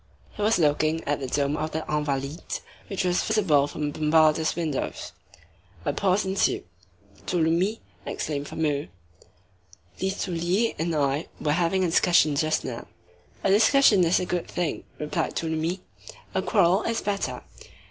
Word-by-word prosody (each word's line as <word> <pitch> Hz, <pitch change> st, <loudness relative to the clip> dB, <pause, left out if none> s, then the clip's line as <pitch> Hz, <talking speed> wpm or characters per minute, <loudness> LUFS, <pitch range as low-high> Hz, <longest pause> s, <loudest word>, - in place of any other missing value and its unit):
He -, -, -8 dB
was 215 Hz, +2 st, +3 dB
looking 155 Hz, 0 st, +1 dB
at 145 Hz, 0 st, -1 dB
the 135 Hz, -, -4 dB
dome 140 Hz, +2 st, 0 dB
of 155 Hz, +1 st, -3 dB
the 160 Hz, 0 st, -3 dB
Invalides, 145 Hz, 0 st, -2 dB, 0.3 s
which 195 Hz, -, -2 dB
was 180 Hz, -1 st, +1 dB
visible 170 Hz, -10 st, +2 dB
from 150 Hz, 0 st, -3 dB
Bombarda's 155 Hz, +1 st, +3 dB
windows. 160 Hz, -5 st, -3 dB, 0.7 s
A -, -, 0 dB
pause 195 Hz, 0 st, +1 dB
ensued. 190 Hz, +1 st, +1 dB, 0.6 s
"Tholomyès," 175 Hz, +5 st, +1 dB, 0.3 s
exclaimed 145 Hz, -2 st, -3 dB
Fameuil, 150 Hz, -, -1 dB, 1.1 s
"Listolier 190 Hz, +2 st, 0 dB
and 165 Hz, 0 st, -1 dB
I 145 Hz, +1 st, 0 dB
were 150 Hz, -, 0 dB
having 175 Hz, +4 st, +1 dB
a -, -, +2 dB
discussion 170 Hz, -4 st, +4 dB
just 155 Hz, +2 st, 0 dB
now." 120 Hz, -3 st, -6 dB, 0.6 s
"A 195 Hz, -, +3 dB
discussion 220 Hz, -1 st, +5 dB
is 170 Hz, +1 st, +3 dB
a 180 Hz, -, -2 dB
good 180 Hz, -1 st, -2 dB
thing," 175 Hz, -3 st, -3 dB
replied 150 Hz, 0 st, -2 dB
Tholomyès; 165 Hz, +3 st, -2 dB, 0.5 s
"a -, -, +1 dB
quarrel 195 Hz, -2 st, +3 dB
is 230 Hz, 0 st, -1 dB
better." 200 Hz, -1 st, -2 dB
165 Hz, 140 wpm, -26 LUFS, 150-190 Hz, 1.1 s, discussion